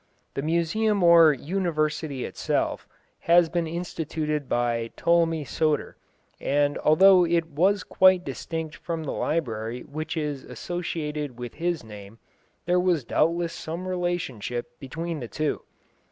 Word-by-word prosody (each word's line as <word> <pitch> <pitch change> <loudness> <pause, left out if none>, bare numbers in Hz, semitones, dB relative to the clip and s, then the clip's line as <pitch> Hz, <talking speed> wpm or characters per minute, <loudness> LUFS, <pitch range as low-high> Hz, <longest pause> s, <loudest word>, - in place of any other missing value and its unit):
The - - -2
museum 175 +6 +1
or 170 -2 +8
university 155 -3 -2
itself, - - -2 0.3
had 170 -1 +4
been 170 -1 0
instituted 160 -3 -3
by 120 -1 0
Ptolemy 165 -2 +2
Soter, 155 +3 -1 0.4
and 145 +1 +1 0.2
though 190 +1 +7
it 170 -1 +1
was 185 +7 +2
quite 185 -1 +4
distinct 160 +3 -5
from 165 -2 -4
the 150 - -3
library 120 -6 -2
which 155 +4 -5
is 150 -3 -3
associated 150 -6 -4
with 120 -1 -7
his 170 -3 -2
name, 105 0 -11 0.5
there 180 +1 +3
was 180 -5 +1
doubtless 170 +7 +1
some 170 +3 -6
relationship 165 - -3
between 165 +4 -5
the 120 - -6
two. 155 +5 -2
160 Hz, 125 wpm, -26 LUFS, 140-170 Hz, 0.5 s, or